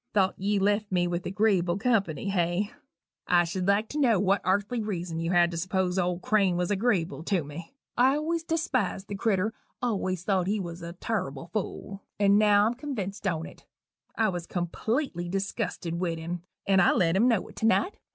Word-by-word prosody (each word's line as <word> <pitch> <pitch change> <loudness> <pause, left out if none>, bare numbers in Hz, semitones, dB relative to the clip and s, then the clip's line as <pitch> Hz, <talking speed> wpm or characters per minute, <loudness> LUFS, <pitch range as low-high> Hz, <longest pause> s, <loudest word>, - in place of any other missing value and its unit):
Thought 190 -2 +3
ye 200 +2 +1
left 205 +1 +1
me 180 -1 +2
with 175 0 -3
agreeable 190 -3 +2
company, 200 - 0
hey? 180 +3 0 0.6
I 175 -1 +5
should 180 +2 -3
like 200 +2 +3
to 300 - -3
know 235 -8 +4
what 195 0 +2
arthly 205 +6 0
reason 175 -6 -3
you 165 0 -2
had 175 -1 +4
to 170 - -4
s'pose 185 +1 0
old 180 0 -1
Crane 195 -5 +2
was 180 +2 -1
agreeable 195 -6 0
to 185 -5 +1
me? 165 - -9 0.2
I 260 +3 +4
always 325 +2 -1
despised 265 - -1
the 200 - -3
critter; 210 +1 0 0.3
always 185 -7 -1
thought 185 -2 +1
he 210 +2 0
wuz 170 -3 -5
a 170 0 -6
turrible 170 -6 -4
fool 200 -1 -4 0.2
and 200 0 +5
now 205 -1 +5
I'm 225 - +1
convinced 215 -7 -4
on't. 160 -3 -4 0.5
I'm 210 -6 +1
completely 175 - -2
disgusted 190 -3 -3
wit 170 -1 -1
him 170 +2 -5 0.2
and 195 -1 +4
I - - +5
let 170 -2 +2
him 220 +6 +4
know 230 -6 +2
it - - -14
to 220 - +1
night. 365 - +1
195 Hz, 185 wpm, -27 LUFS, 175-215 Hz, 0.6 s, I